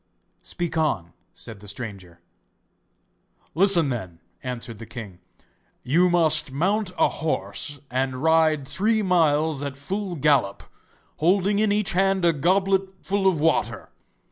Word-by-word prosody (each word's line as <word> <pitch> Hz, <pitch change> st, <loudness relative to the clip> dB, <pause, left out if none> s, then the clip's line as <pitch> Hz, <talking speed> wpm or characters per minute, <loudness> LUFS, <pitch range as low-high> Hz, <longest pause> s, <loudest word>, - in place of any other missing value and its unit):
'Speak 175 Hz, -2 st, -5 dB
on,' 95 Hz, -, -1 dB, 0.2 s
said 110 Hz, -3 st, -9 dB
the 105 Hz, -, -14 dB
stranger. 100 Hz, -6 st, -8 dB, 1.3 s
'Listen, 175 Hz, -4 st, +3 dB
then,' 95 Hz, -10 st, -5 dB, 0.2 s
answered 120 Hz, -3 st, -6 dB
the 115 Hz, -, -8 dB
king; 100 Hz, -7 st, -9 dB, 0.6 s
'you 170 Hz, +8 st, +3 dB
must 160 Hz, -5 st, +2 dB
mount 185 Hz, +7 st, 0 dB
a -, -, +4 dB
horse 150 Hz, -2 st, -2 dB
and 130 Hz, +1 st, -2 dB
ride 160 Hz, -3 st, +3 dB
three 215 Hz, +8 st, +1 dB
miles 160 Hz, -5 st, +2 dB
at 140 Hz, -1 st, -5 dB
full 185 Hz, +5 st, -4 dB
gallop, 135 Hz, -9 st, +1 dB, 0.5 s
holding 195 Hz, +5 st, +2 dB
in 215 Hz, -1 st, +2 dB
each 210 Hz, -1 st, +1 dB
hand 190 Hz, 0 st, +1 dB
a 170 Hz, -, +4 dB
goblet 190 Hz, +5 st, +1 dB
full 195 Hz, 0 st, 0 dB
of 180 Hz, -5 st, +2 dB
water. 160 Hz, +1 st, 0 dB
160 Hz, 130 wpm, -24 LUFS, 130-190 Hz, 1.3 s, a